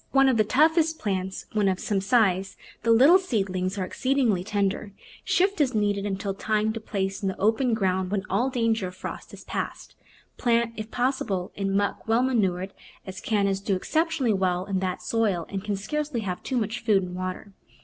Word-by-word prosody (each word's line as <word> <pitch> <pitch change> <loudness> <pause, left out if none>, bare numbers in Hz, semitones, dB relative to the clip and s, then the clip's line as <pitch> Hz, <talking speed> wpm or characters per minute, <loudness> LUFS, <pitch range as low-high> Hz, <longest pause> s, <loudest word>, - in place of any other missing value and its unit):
Though - - +2
one 270 0 +6
of 255 - +2
the 215 - +5
toughest 315 - +3
plants 190 -4 -3
when 210 -2 +2
of 190 -1 +1
some 200 -2 -1
size, 195 -3 +2 0.2
the 230 - -1
little 275 +11 +7
seedlings 195 - -1
are 190 - -1
exceedingly 250 -5 +1
tender. 200 0 -1 0.3
Shift 385 -2 +2
as 260 -5 +1
needed 205 -1 +1
until 195 0 -2
time 215 +2 0
to 225 - -4
place 195 -3 -3
in 195 - -1
the 190 - -5
open 225 +3 +2
ground 190 -3 0
when 200 -1 -1
all 255 +3 +1
danger 230 -6 0
of 180 - -9
frost - - -7
is - - -11
past. - - -5 0.4
Plant, 235 -2 +1
if 215 0 -6
possible, 240 -8 -1
in 195 -1 -1
muck 200 +2 -1
well 225 +2 +3
manured, 195 -7 0 0.3
as 190 -1 -7
Cannas 200 -3 +1
do 200 -1 0
exceptionally 315 - 0
well 185 -2 0
in 195 -2 -1
that 185 -1 -3
soil 205 -7 0
and 195 -1 -4
can 210 -1 -1
scarcely 290 +4 -3
have 185 -3 -4
too 260 - -2
much 225 0 -1
food 205 -4 +3
and 180 0 -6
water. 185 +2 -5
205 Hz, 195 wpm, -26 LUFS, 190-240 Hz, 0.4 s, little